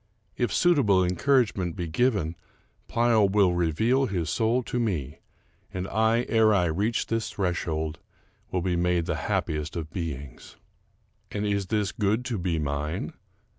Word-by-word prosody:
If 120 -4 0
suitable 125 - +4
encouragement 95 -2 +1
be 90 -3 -3
given, 95 -3 +1 0.5
Pleyel 115 -4 +3
will 95 -3 +3
reveal 110 - +2
his 85 -7 -2
soul 115 +6 +1
to 120 - -3
me; 85 - -2 0.5
and 95 0 -4
I, 110 +3 +2
ere 110 -2 +4
I 90 -3 +3
reach 100 +8 0
^his 115 -1 -2
threshold, 80 -4 -2 0.5
will 90 -2 -1
be 90 -1 0
made 85 -1 +1
the - - -1
happiest 75 +2 -1
of 80 -2 -5
beings. 70 -7 -6 0.7
And 105 0 -3
is 100 -2 0
this 105 0 0
good 110 +2 0
to 120 -6 -2
be 85 -2 -1
mine? 75 0 -3
95 Hz, 145 wpm, -26 LUFS, 85-110 Hz, 0.7 s, suitable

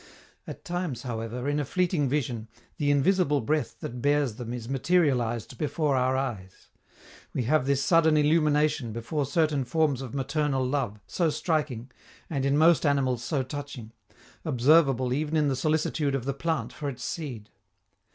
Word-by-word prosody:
At - - -9
times, 175 - -3
however, 120 +1 -4
in 145 +1 +1
a - - 0
fleeting 170 -1 0
vision, 125 -5 -2 0.3
the 145 -1 0
invisible 145 +1 +3
breath 150 +6 -1
that 120 0 -6
bears 145 -3 +2
them 120 -2 -6
is 120 -2 -5
materialized 130 - 0
before 150 -1 0
our 130 0 +2
eyes. 110 -9 -5 0.7
We 130 - 0
have 135 +2 +2
this 140 0 +2
sudden 160 0 +4
illumination 150 -5 +2
before 115 +5 -2
certain 150 -2 +1
forms 145 0 +1
of 130 0 -7
maternal 140 -1 0
love, 125 -6 -2
so 170 -3 0
striking, 145 -7 -2 0.4
and 140 -3 0
in 140 +1 +2
most 165 +1 +5
animals 130 -5 +1
so 135 +1 -1
touching, 130 -4 -7 0.5
observable 135 -3 +3
even 150 +3 -1
in 150 -2 +3
the 135 - 0
solicitude 150 0 0
of 130 -3 -3
the 140 - -1
plant 135 -5 -2
for 145 +1 -4
its 125 -2 -7
seed. 125 -11 -5
140 Hz, 160 wpm, -27 LUFS, 125-155 Hz, 0.7 s, most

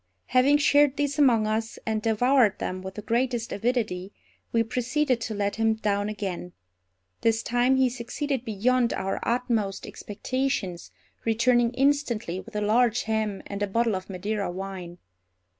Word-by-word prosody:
Having 260 +3 +5
shared 290 -1 +4
these 285 0 -1
among 240 -6 +5
us, 220 +2 -2
and 220 -1 -1
devoured 225 0 +3
them 185 0 -4
with 190 0 -7
the 210 - -7
greatest 240 0 0
avidity, 210 -5 -1 0.4
we 230 0 +3
proceeded 250 +2 0
to 225 -1 -3
let 200 +1 -1
him 225 0 +2
down 205 -1 -1
again. 185 -4 -5 0.7
This 225 0 +2
time 245 +2 +2
he 265 0 +4
succeeded 250 +2 -3
beyond 240 +3 +1
our 195 +1 -2
utmost 230 -5 -1
expectations, 210 -5 -3 0.3
returning 235 +1 +3
instantly 255 - +1
with - - -12
a 210 - 0
large 230 +2 +3
ham 220 -2 -2
and 200 0 -6
a 205 - +1
bottle 230 +1 +1
of 185 +1 -6
Madeira 200 +2 -2
wine. 185 -1 -6
225 Hz, 150 wpm, -26 LUFS, 205-250 Hz, 0.7 s, Having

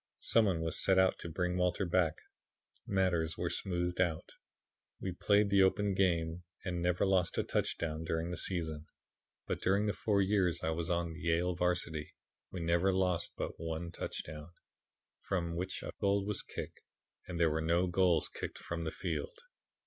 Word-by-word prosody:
Some 115 -1 +4
one 90 -5 +1
was 80 -1 0
sent 95 -1 +5
out 95 0 +3
to 85 - -6
bring 90 +2 -1
Walter 90 +2 +1
back; 85 -3 +2 0.7
matters 85 -5 +1
were - - -1
smoothed 90 -1 -1
out; 85 -4 -1 0.7
we 95 - -3
played 100 +3 +3
the 100 -1 +6
open 100 +1 +3
game 85 -3 +1 0.2
and 90 -2 -2
never 90 +2 +2
lost 95 -3 +2
a - - +2
touchdown 80 -1 -1
during 80 +1 -2
the - - -2
season. 80 -3 -2 0.6
But - - -3
during 100 +3 +2
the 105 - +1
four 105 -2 +1
years 95 -3 +2
I 80 - +1
was 80 0 -2
on 85 -1 0
the 80 - -9
Yale 85 +2 +1
varsity 90 -3 -1 0.4
we 90 - -5
never 85 +3 +3
lost 90 -2 +1
but - - -4
one 80 +1 -4
touchdown, 75 -2 -6 0.7
from 85 -3 -2
which 90 +2 -3
a - - -4
goal 100 0 +2
was 105 -1 -2
kicked - - -7 0.5
and 85 -2 -4
there 85 -2 +4
were 80 +1 0
no 85 +3 +2
goals 90 -2 +3
kicked - - -6
from 85 -1 -4
the 80 - -2
field. 475 0 -4
90 Hz, 175 wpm, -33 LUFS, 80-95 Hz, 0.7 s, the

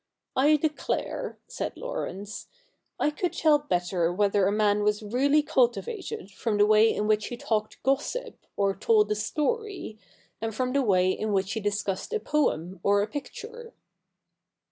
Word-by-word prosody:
I 290 +4 +5
declare,' 315 - -2
said - - -5
Laurence, 210 - -5 0.2
' - - -49
I 300 - +2
could 355 +4 -2
tell 305 -2 +4
better 175 - 0
whether 200 +1 +2
a - - +2
man 210 0 +2
was 210 +1 +1
really 275 +8 +2
cultivated 265 - -1
from 210 +2 -2
the 205 - +5
way 215 +1 +5
in 210 - -1
which 215 0 +2
he 240 - -6
talked 215 -2 -2
gossip, 290 - -2
or 195 -1 +1
told 435 -2 +3
a - - +2
story, 305 - -2 0.4
than 225 0 -3
from 255 +3 -1
the 280 - +3
way 185 -6 +3
in 215 +2 -2
which 195 0 0
he 225 - -2
discussed 205 - -2
a 440 - +1
poem 190 - 0
or 200 0 +3
a - - -3
picture.' 460 - -8
220 Hz, 165 wpm, -27 LUFS, 205-300 Hz, 0.4 s, I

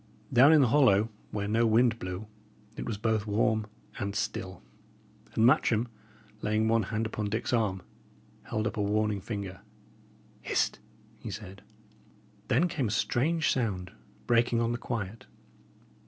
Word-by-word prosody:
Down 135 +5 +7
in 155 -2 +7
the 130 - +4
hollow, 110 -6 +4 0.2
where 100 -1 -3
no 115 +2 +2
wind 115 +1 +3
blew, 90 +3 -5 0.5
it - - -5
was 110 - -2
both 110 0 0
warm 110 +1 +1 0.3
and 100 0 -3
still; 95 -3 -4 0.7
and 110 - +4
Matcham, 120 -1 +3 0.5
laying 110 +1 +1
one 115 0 +3
hand 110 +2 -2
upon 105 -1 -3
Dick's 120 +4 -2
arm, 100 -6 0 0.6
held 110 0 -2
up 110 - -2
a - - 0
warning 105 0 0
finger. 100 -4 -5 0.8
"Hist!" - - 0 0.4
he - - -7
said. 100 -1 -8 0.9
Then 155 +10 +3
came 160 -9 -1
a - - -3
strange 140 +9 +1
sound, 95 -8 -1 0.3
breaking 120 0 +3
on 115 0 +1
the 120 - -2
quiet. 115 -3 -5
110 Hz, 145 wpm, -29 LUFS, 100-120 Hz, 0.9 s, Down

